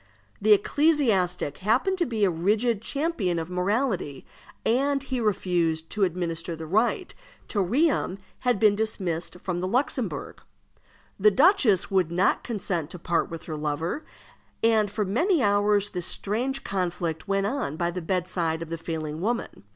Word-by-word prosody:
The 215 +1 +6
ecclesiastic 205 - +2
happened 255 - +1
to 345 - +1
be 225 -3 -1
a - - +3
rigid 205 +6 +1
champion 275 - -1
of 165 +2 -4
morality, 185 - -1 0.4
and 275 +4 +2
he 260 -2 -3
refused 175 -7 0
to 210 - 0
administer 170 -2 -2
the 160 0 -7
rite 225 - +1 0.3
till 205 - 0
Riom 260 - +1 0.2
had 245 -5 +1
been 210 -1 +5
dismissed 185 -6 -2
from 180 -1 -3
the 185 - -1
Luxembourg. 255 +8 -2 0.8
The 210 +2 +6
duchess 255 - +4
would 185 -4 +2
not 180 +3 +2
consent 180 - -3
to 180 - -8
part 170 0 0
with 165 -1 -7
her 155 - -5
lover, 155 - -2 0.6
and 220 -2 +4
for 210 +1 -1
many 310 - +2
hours 205 0 +2
this 180 -2 -2
strange 250 +7 -1
conflict 175 -3 -2
went 195 0 +1
on 205 - -2
by 170 0 0
the 180 +1 -4
bedside 170 -2 -1
of 165 - -10
the 165 - -3
failing 160 -1 -4
woman. 230 - -3
195 Hz, 155 wpm, -26 LUFS, 170-230 Hz, 0.8 s, The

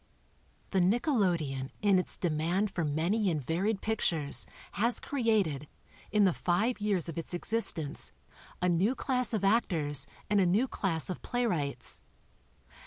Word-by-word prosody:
The 190 - +2
nickelodeon 180 - +1
in 200 -3 +5
its 180 - -2
demand 175 +5 0
for 170 - -2
many 170 +8 +1
and 160 -3 0
varied 190 - -1
pictures 165 -9 0 0.2
has 235 +4 +1
created, 210 - 0 0.4
in 210 0 +4
the 185 -3 +4
five 205 +9 0
years 200 -6 +1
of 165 0 -4
its 165 +2 -4
existence, 175 -7 -1 0.5
a - - +4
new 185 +8 +2
class 255 -3 0
of 215 -4 -1
actors 160 - +2 0.2
and 205 -1 +3
a - - +4
new 210 +9 +3
class 170 -9 -1
of 180 - -6
playwrights. 170 - -2
185 Hz, 140 wpm, -30 LUFS, 160-220 Hz, 0.5 s, in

